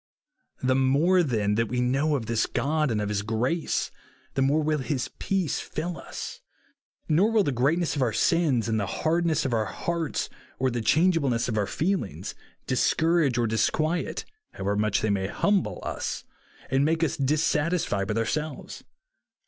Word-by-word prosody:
The 130 0 +3
more, 140 +8 +4
then, 110 -9 +1
that 115 +2 +1
w^e 125 +3 -2
know 135 +5 +2
of 125 -5 -2
this 115 0 0
God 155 0 0
and 110 -3 0
of 105 -1 -2
his 105 -1 0
grace, 120 +10 -1 0.4
the 135 - 0
more 145 +4 +3
will 155 0 +1
his 130 -1 -2
peace 190 -6 0
fill 165 0 -4
i;s. - - -7 0.7
Nor 175 +8 +4
will 225 -2 +3
the 145 - 0
greatness 145 +7 +1
of 140 - -1
our 120 -3 +2
sins, 135 -3 +2
and 110 -1 +1
the 100 - -1
hardness 160 - +1
of 130 - -1
our 110 -2 +1
hearts, 165 +7 -2 0.3
or 130 0 +1
the 120 0 -2
changeable 160 - +3
ness 115 -1 0
of 115 - -2
our 105 -2 +1
feelings, 175 - -2 0.3
discourage 160 +1 +2
or 120 - +2
disquiet, 155 +9 0 0.3
how^ever 100 +2 -1
much 105 -1 +1
they 110 - +1
may 95 -1 0
humble, 200 - +1
us, - - -3 0.5
and 135 +1 +3
make 165 +2 +1
us 160 - +1
dissatisfied 150 - +1
with 105 - -1
ourselves.. 145 +6 -3
135 Hz, 170 wpm, -26 LUFS, 115-160 Hz, 0.7 s, more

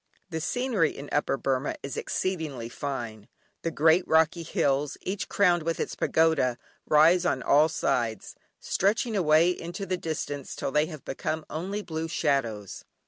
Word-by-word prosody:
The 160 -1 -3
scenery 240 - 0
in 140 +1 -8
Upper 145 -1 +1
Burmah 135 +1 -1
is 140 - -5
exceedingly 155 -11 -3
fine. 120 -6 -5 0.3
The 165 - -1
great 160 +3 +4
rocky 160 +2 +3
hills, 145 -3 0
each 195 +1 -4
crowned 180 -4 +3
with 165 +1 -2
its - - -2
pagoda, 160 -7 +2 0.3
rise 165 +4 +5
on 140 -8 0
all 150 +3 +5
sides, 115 -8 -1 0.3
stretching 220 +4 0
away 165 -1 +4
into 175 +3 -5
the 185 -1 -1
distance 145 -4 -4
till - - -3
they 150 +2 +2
become 155 +3 -4
only 190 +7 -3
blue 160 -2 -4
shadows. 125 - -1
160 Hz, 145 wpm, -27 LUFS, 140-175 Hz, 0.3 s, rise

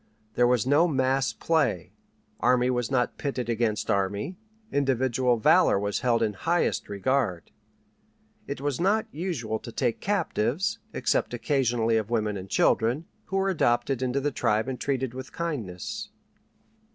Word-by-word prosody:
There 120 - +3
was 125 -2 +2
no 145 +6 +4
mass 135 -3 +1
play; 160 - 0 0.5
army 125 +2 +3
was 125 -2 -1
not 125 -2 0
pitted 130 -4 -3
against 115 -2 0
army; 100 - -1 0.4
individual 130 -3 +1
valor 160 - +5
was 100 0 -1
held 120 -2 +2
in 105 -2 0
highest 165 - 0
regard. 100 - -1 1.0
It - - -4
was 145 0 -2
not 210 +4 +2
usual 140 - -3
to 115 - -9
take 120 -1 -1
captives, 180 - 0
except - - 0
occasionally 120 -5 +1
of 110 -1 -2
women 110 -3 0
and 95 0 -7
children, 120 - +2 0.2
who 195 - -2
were 195 0 +1
adopted 120 -5 +1
into 130 +1 0
the 145 +1 -1
tribe 110 -2 0
and 130 -1 -4
treated 130 -3 -1
with 130 0 -8
kindness. 120 - -4
125 Hz, 145 wpm, -27 LUFS, 110-145 Hz, 1.0 s, valor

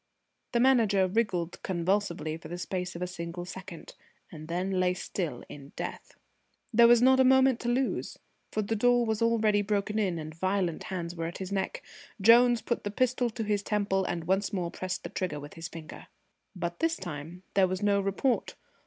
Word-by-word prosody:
The 235 - +3
Manager 230 -7 +4
wriggled 185 -4 -1
convulsively 175 -3 -1
for 160 -1 -10
the 175 +2 -5
space 180 0 -4
of 175 - -4
a - - 0
single 175 -1 -6
second, 185 -3 -9 0.4
and 155 -1 -9
then 185 +3 -1
lay 180 0 +2
still 175 -3 -4
in 140 -1 -11
death. - - -6 0.6
There 235 +1 +7
was 240 0 +6
not 260 +1 +6
a - - +7
moment 260 -1 +5
to 240 - -2
lose, 255 +2 -1 0.3
for 215 - -1
the 225 +3 -1
door 245 +2 +3
was 220 0 -1
already 220 -3 +3
broken 210 +1 -1
in 185 -5 0
and 155 0 -6
violent 185 0 -1
hands 175 -4 -4
were 165 -1 -3
at 170 - -6
his 190 0 -6
neck. 200 - -2 0.4
Jones 235 +3 +6
put 235 - -2
the 205 - -2
pistol 250 +2 +1
to 225 0 -4
his 205 -1 0
temple 200 -2 0
and 175 -2 -3
once 190 +4 0
more 175 -4 -2
pressed 185 0 -4
the - - -5
trigger 175 -6 -3
with 145 0 -10
his 165 0 -6
finger. 165 -4 -10 0.5
But 170 -1 -4
this 330 0 +1
time 170 +1 -7
there 195 -1 +4
was 185 +2 -3
no 200 -1 +3
report. 200 +6 0
195 Hz, 195 wpm, -29 LUFS, 175-225 Hz, 0.6 s, There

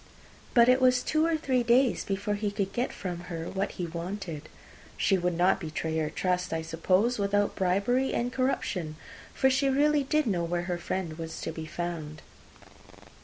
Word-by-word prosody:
But 235 -1 +7
it 255 +1 +5
was 250 -1 +4
two 310 +1 +2
or 330 -1 +1
three 260 -5 +1
days 240 +2 +3
before 200 +1 -2
he 205 0 -1
could 200 -1 -3
get 245 +4 -1
from 180 -3 -5
her 165 -1 -4
what 195 +1 -2
he 180 - -3
wanted. 170 -1 -6 0.5
She 195 - +3
would 175 -2 0
not 180 +2 +3
betray 160 -1 -3
her 155 -1 -1
trust, 180 +2 -1
I 160 0 -1
suppose, 185 +8 +1
without 205 0 +1
bribery 200 +8 +1
and 245 +1 -1
corruption, 205 - -1 0.4
for 265 - +2
she 265 +1 +2
really 290 +2 +3
did 305 +2 +1
know 185 -7 0
where 175 +1 -1
her 175 -1 -3
friend 170 -2 -4
was 160 0 -6
to - - -3
be 160 0 -7
found. 160 -3 -5
195 Hz, 180 wpm, -28 LUFS, 170-245 Hz, 0.5 s, But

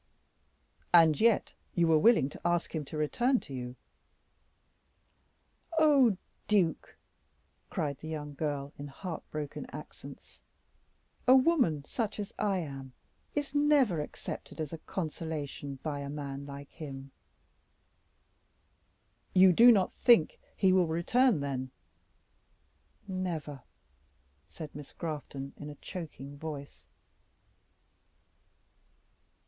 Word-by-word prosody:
"And 160 -3 +6
yet 230 -2 +3 0.2
you 170 - +4
were 160 -1 +5
willing 220 - +5
to - - -11
ask 175 0 0
him 160 -2 -2
to 155 - -7
return 240 - +2
to 140 - -10
you." 125 -1 -5 2.0
"Oh! 275 -10 +5 0.3
duke," 185 -7 +1 0.7
cried 140 -2 -2
the 155 - -8
young 150 -2 -5
girl 145 -1 -3
in 145 - -5
heart 165 +4 -6
broken 150 -2 -5
accents, - - -11 0.9
"a 255 - +9
woman 255 - +3
such 220 - -3
as 205 - -5
I 200 -2 +1
am 135 -4 -7 0.4
is 290 -2 -2
never 290 - +3
accepted 150 - -7
as 155 -1 -4
a 165 - -5
consolation 155 -5 -5
by 150 -2 -2
a 140 0 -5
man 140 -1 -5
like 140 0 -9
him." 135 -4 -8 2.2
"You 185 0 +8
do 240 +6 +8
not 195 -5 +3
think 235 -10 +4 0.2
he 190 -1 +4
will 185 -2 +4
return, 175 - +2
then?" 130 -2 -3 1.4
"Never," 170 -7 -4 0.9
said 145 - -9
Miss 145 -1 -10
Grafton, 145 -4 -5
in 145 - -7
a 145 - -8
choking 145 -5 -8
voice. 145 -3 -7
160 Hz, 110 wpm, -31 LUFS, 145-195 Hz, 2.2 s, a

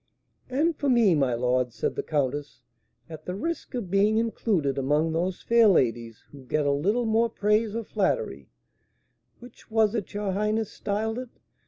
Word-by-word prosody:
"And 305 +6 +1
for 285 - -1
me, 235 -7 +5
my 135 -6 +1
lord," 125 +1 0
said 110 - -2
the - - -1
countess, 145 -3 -3 0.4
"at 155 -2 -10
the 180 - -3
risk 330 +5 -4
of 210 -8 -4
being 205 +2 +3
included 195 - 0
among 150 +4 +1
those 180 +3 -2
fair 230 -1 +5
ladies 115 - +1
who 140 -2 -12
get 145 +4 -1
a 140 - +3
little 200 +12 +1
more 225 +1 +2
praise 210 0 +1
or 230 - -2
flattery 110 - -2 0.9
(which 245 0 -16
was 220 -1 +2
it 210 -4 -4
your 205 -1 -1
highness 210 +2 -1
styled 220 +3 -2
it?) 255 -1 -7
200 Hz, 170 wpm, -26 LUFS, 145-225 Hz, 0.9 s, me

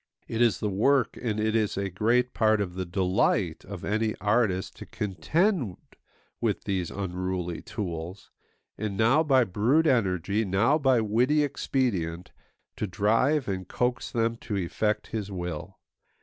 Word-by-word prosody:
It 115 - -2
is 115 -6 +3
the 105 - 0
work 120 +6 +2
and 110 -3 -1
it 110 +1 0
is 110 -3 +1
a 100 -1 -2
great 120 +6 +1
part 110 -1 +3
of 95 -3 -2
the 95 0 -4
delight 90 -1 +1
of 95 -2 -7
any 110 +1 0
artist 105 -2 0
to - - -9
contend 130 - 0 0.6
with - - -1
these 95 -4 -2
unruly 90 -2 -3
tools, 95 -4 -6 0.5
and 105 -2 -3
now 120 +8 +4
by 135 -5 +4
brute 115 - +2
energy, 100 - +1
now 110 +10 +2
by 130 -4 +3
witty 125 +8 +2
expedient, 95 - -1 0.5
to 105 - -2
drive 115 +9 +2
and 95 -2 -3
coax 125 +4 -1
them 115 0 0
to 105 -3 -4
effect 105 +4 -1
his 105 -3 -3
will. 90 -4 -5
105 Hz, 150 wpm, -27 LUFS, 95-120 Hz, 0.6 s, now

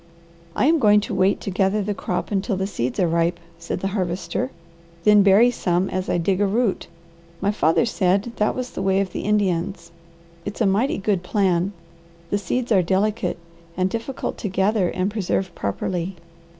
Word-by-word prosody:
"I - - +2
am 320 +2 +4
going 210 -4 +5
to - - -5
wait 190 +2 +2
to 195 - -4
gather 195 +2 +1
the 205 +1 -1
crop 180 0 -3
until 200 0 0
the 190 - -1
seeds 125 - -3
are 180 - +3
ripe," 170 +1 +1 0.2
said 170 +1 -4
the 195 - -1
Harvester, 175 -7 -2 0.5
"then 210 -1 +6
bury 205 +5 +6
some 180 -4 0
as 185 +1 -2
I - - +1
dig 185 +3 0
a 205 - +3
root. 215 0 0 0.5
My 200 +2 +1
father 165 +1 +2
said 200 0 +1
that 210 - +1
was 255 -1 -4
the - - -5
way 190 0 +2
of 195 -2 -1
the - - -4
Indians. 195 -3 -1 0.5
It's 205 - -6
a 225 - +3
mighty 205 +8 +2
good 195 -2 0
plan. 185 -1 +1 0.6
The 205 - +1
seeds 240 +6 -2
are 195 -4 +5
delicate, 195 +2 0 0.4
and 185 0 +1
difficult 230 +3 -4
to 205 - -3
gather 190 0 +1
and 185 +2 -1
preserve 190 -3 -1
properly. 170 - -3
195 Hz, 185 wpm, -22 LUFS, 180-210 Hz, 0.6 s, then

